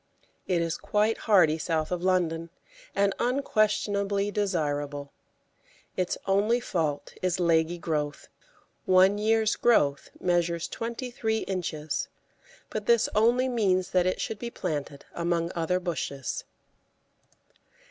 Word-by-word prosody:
It 175 -2 +1
is 165 -1 -2
quite 210 +2 +1
hardy 165 -6 +5
south 160 0 -1
of 180 -1 -1
London, 170 -3 +1 0.5
and 200 0 +2
unquestionably 205 -5 +1
desirable. 145 -8 -2 0.8
Its 185 -1 -1
only 205 +5 +2
fault 160 -10 -2
is 185 -1 0
leggy 165 0 +2
growth; 150 -3 -3 0.6
one 190 +2 +5
year's 220 0 +2
growth 145 -12 +2
measures 170 -1 0
twenty 235 +2 -5
three 220 -2 -1
inches, 160 -5 -3 0.6
but 215 -1 -4
this 235 -2 +4
only 240 +4 +3
means 195 -7 +1
that 180 -1 +3
it 185 - 0
should 220 - -3
be 240 - -4
planted 145 -8 -4
among 170 0 -1
other 170 +2 0
bushes. 140 -6 -4
185 Hz, 115 wpm, -27 LUFS, 165-210 Hz, 0.8 s, hardy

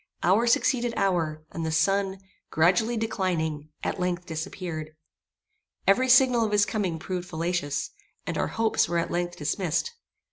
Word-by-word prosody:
Hour 205 +7 +3
succeeded 240 0 +2
hour, 165 -5 0
and 165 - -4
the 160 - -1
sun, 195 +4 +1 0.3
gradually 185 +9 +2
declining, 170 -9 -2
at - - -2
length, 180 -1 -1
disappeared. 160 -1 -5 0.9
Every 255 +7 +4
signal 250 -2 +6
of 215 - -1
his 205 -1 +4
coming 190 -7 -2
proved 180 +2 -5
fallacious, 165 -3 -2 0.3
and - - -3
our - - 0
hopes 225 -1 +1
were 170 - 0
at 170 - -1
length 175 0 -2
dismissed. 165 - -1
180 Hz, 145 wpm, -26 LUFS, 160-215 Hz, 0.9 s, signal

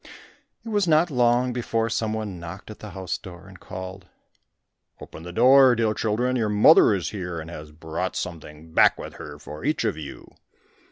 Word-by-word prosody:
It - - -6
was 205 -4 +1
not 160 +1 +3
long 125 0 +2
before 115 -2 -1
some 115 -1 -1
one 105 -5 -4
knocked 85 +5 -9
at 110 - -12
the 105 - -9
house 95 -3 -5
door 90 -2 -12
and - - -14
called, 95 0 -8 0.9
"Open - - -11
the 90 +1 -8
door, 130 +5 +6
dear 110 -1 +1
children; 120 +4 -1
your 115 -4 0
mother 105 +2 +6
is 90 - -3
here, 90 -5 -5
and 80 +1 -8
has 75 -2 -9
brought 80 +4 -4
something 80 -2 -7
back - - +5
with - - -9
her 75 -3 -9
for 75 +1 -10
each - - 0
of - - -1
you." 75 -3 -10
100 Hz, 185 wpm, -24 LUFS, 85-120 Hz, 0.9 s, door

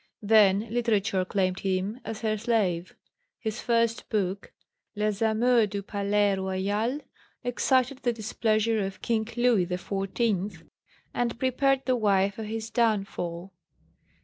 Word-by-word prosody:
Then 205 -2 +5
literature 215 -5 +1
claimed 185 0 0
him 195 +4 -1
as 220 - -6
her 215 -2 0
slave. 205 -6 0 0.4
His 220 -1 -4
first 230 -1 +1
book, 200 -2 -2 0.4
Les 210 0 -1
amours 225 +1 +3
du 200 0 -4
Palais 200 0 +1
Royal, 200 +7 -1 0.4
excited 255 +2 +1
the 245 - +1
displeasure 220 -1 0
of 195 0 -6
King 220 -2 0
Louis 240 -7 +3
XIV., 195 0 -2 0.5
and 235 -1 -1
prepared 265 +2 +1
the 255 - +2
way 200 -4 +2
for 210 - -8
his 220 +1 -5
downfall. 195 -6 -1
215 Hz, 120 wpm, -27 LUFS, 195-230 Hz, 0.5 s, Then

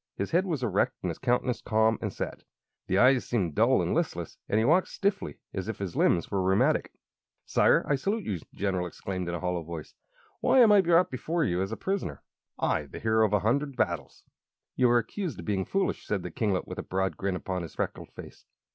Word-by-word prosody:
His 100 - -3
head 185 +4 +2
was 155 -8 -2
erect 100 -5 +1
and 90 - 0
his 80 - -8
countenance 125 -1 0
calm 110 0 +2
and - - -2
set. - - -5 0.4
The 95 - +1
eyes 130 +3 +5
seemed 95 -10 -1
dull - - +3
and - - -1
listless, - - -2
and 105 - +2
he 110 - +3
walked 175 +7 +4
stiffly, 200 0 -2 0.2
as 95 -1 -4
if 110 - -4
his 95 -4 -5
limbs 85 - +2
were 100 -2 +1
rheumatic. 95 +1 +2 0.5
"Sire, - - +3
I - - +2
salute 200 +11 -1
you!" 95 - -3
the - - -18
General 95 -3 -1
exclaimed, 90 0 -5
in 85 - -2
a - - -4
hollow 90 -1 -1
voice. 80 -1 -8 0.5
"Why - - +3
am 225 -3 +7
I 205 -1 +7
brought 175 0 +3
before 160 +6 -1
you 90 -8 0
as 95 +2 -2
a 115 - -4
prisoner 190 - -3 0.3
I, - - 0
the - - -9
hero 110 0 +2
of 105 - -5
a 105 - +3
hundred 140 +6 0
battles?" 85 - -2 0.5
"You 125 -1 +4
are 120 - +5
accused 165 - -3
of 85 - -8
being 95 -3 -1
foolish," 195 0 -1
said 100 -4 -1
the 90 - -6
kinglet, 100 0 -1
with - - -6
a - - -1
broad 95 0 -2
grin 95 -1 -2
upon 90 0 -3
his 85 - -8
freckled - - -4
face. - - -12
105 Hz, 225 wpm, -28 LUFS, 90-135 Hz, 0.5 s, am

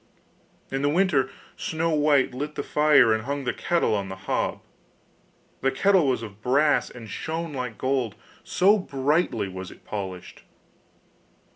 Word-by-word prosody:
In 135 0 -1
the 145 - +2
winter 150 -6 +2 0.3
Snow 165 +1 -1
white 145 -4 +3
lit 145 +4 -4
the - - -3
fire 145 -6 +5
and 110 +1 -2
hung 140 +1 -3
the 125 - -1
kettle 170 -9 +1
on 100 -2 -2
the 95 - -5
hob. 95 - -2 1.0
The 135 - +3
kettle 180 +4 +3
was 125 -3 0
of 105 -1 -10
brass 145 +5 +2
and 120 -2 -10
shone 160 +8 -4
like 125 -4 -4
gold, 130 -5 -1 0.3
so 200 +4 +3
brightly 140 - 0
was 95 -1 -7
it - - -16
polished. 95 -4 -6
135 Hz, 150 wpm, -25 LUFS, 115-155 Hz, 1.0 s, fire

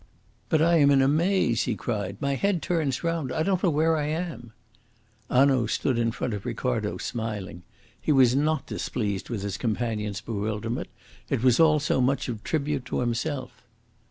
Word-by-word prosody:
"But 155 -1 +3
I 170 +1 +4
am 145 -2 +5
in 135 -1 +5
a - - +4
maze," 160 - +2
he 120 - -1
cried. 100 -4 -3
"My 140 0 0
head 190 +4 0
turns 155 -6 -1
round. 165 -6 -1
I 160 - 0
don't 190 0 +1
know 185 - +3
where 160 +1 +2
I 150 -1 -1
am." 155 -8 -4 0.8
Hanaud 130 -2 +4
stood 120 +2 0
in 115 -1 +1
front 115 +1 -3
of 100 -1 -5
Ricardo, 120 -3 -2
smiling. 105 -6 -5 0.4
He - - 0
was 130 -3 +5
not 155 +3 +1
displeased 100 -5 -3
with 110 -5 -3
his 100 -1 -3
companion's 110 -3 -2
bewilderment; 110 +2 -3 0.4
it 115 - -1
was 125 -2 +4
all 155 -2 +5
so 140 -2 +1
much 135 +3 +1
of 110 -3 -5
tribute 145 -4 -1
to - - -2
himself. 125 +3 -3
130 Hz, 180 wpm, -26 LUFS, 115-155 Hz, 0.8 s, am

